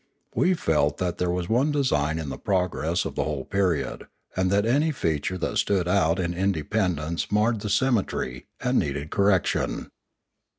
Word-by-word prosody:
We 185 +1 +3
felt 75 - +1
that 90 -1 -2
there 90 - +1
was 90 0 -1
one 130 +8 +2
design 80 - +1
in 80 -3 -4
the - - -6
progress 90 -3 0
of - - -4
the - - 0
whole 75 -4 -3
period, 90 -9 -1 0.3
and 95 0 +1
that 100 +2 +2
any 145 +7 +3
feature 85 - -1
that - - -1
stood 95 -4 +1
out 90 -2 +3
in 90 -2 -1
independence 85 -2 -1
marred 105 +2 +2
the 105 - -3
symmetry, 100 - 0
and - - +2
needed 70 +1 -3
correction. 100 -3 +1
90 Hz, 165 wpm, -25 LUFS, 80-105 Hz, 0.3 s, We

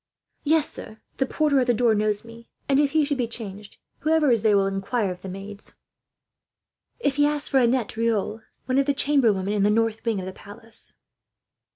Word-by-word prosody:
"Yes, 310 0 +3
sir. 220 - -8 0.2
The 265 - +1
porter 295 -2 +2
at 255 - +1
the 245 - +3
door 235 0 +3
knows 210 0 0
me; 230 0 -13 0.2
and 275 0 +3
if 290 -1 +2
he 310 -2 +3
should 285 -2 -2
be 240 - +1
changed, 210 -3 -8 0.2
whoever 310 -3 +3
is 230 -3 +3
there 210 -2 +4
will 195 - +3
inquire 195 +2 -1
of 180 - -8
the 190 - -7
maids, 200 +2 -9 1.3
if 285 - 0
he 290 0 +5
asks 295 0 -2
for 270 - +4
Annette 240 -2 +1
Riolt, 225 -1 -1 0.2
one 255 +1 +1
of 275 - +1
the 285 - +2
chamber 275 -5 +3
women 195 +1 -2
in 210 - 0
the 205 - +4
north 225 +1 +1
wing 225 -4 0
of 185 - -5
the 185 - -6
palace." 215 +4 -7
230 Hz, 210 wpm, -24 LUFS, 205-275 Hz, 1.3 s, he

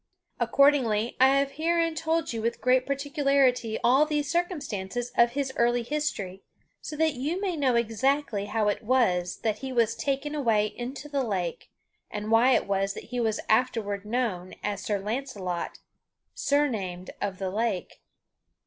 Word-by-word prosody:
Accordingly, 245 -6 +3
I 260 - +7
have 275 0 +1
herein 330 +3 +1
told 325 -2 -1
you 225 - -3
with 230 +1 -1
great 255 0 +2
particularity 275 -4 +1
all 260 +5 +5
these 295 -2 -1
circumstances 245 - -2
of 235 0 +4
his 270 -1 -2
early 240 0 +2
history 230 -10 -3 0.4
so 305 - -6
that 315 0 +2
you 290 +8 -2
may 385 -3 -1
know 270 -5 +2
exactly 235 -1 0
how 215 0 0
it 205 - 0
was 200 -8 +1
that 215 -2 0
he 265 -1 -5
was 230 -3 +2
taken 275 +4 -2
away 230 -8 +2
into 245 +6 -6
the 285 -2 -1
lake, 185 -7 -3 0.4
and 210 +1 -4
why 240 +3 +5
it - - +1
was 195 0 0
that - - -7
he 245 - 0
was 220 -2 0
afterward 220 -4 +1
known 210 -5 -2
as 205 -1 -2
Sir 205 -1 -1
Launcelot, 205 -5 -4 0.6
surnamed 210 -11 -1
of 195 -2 -2
the 190 -1 -3
Lake. 210 -2 -2
240 Hz, 155 wpm, -27 LUFS, 210-280 Hz, 0.6 s, I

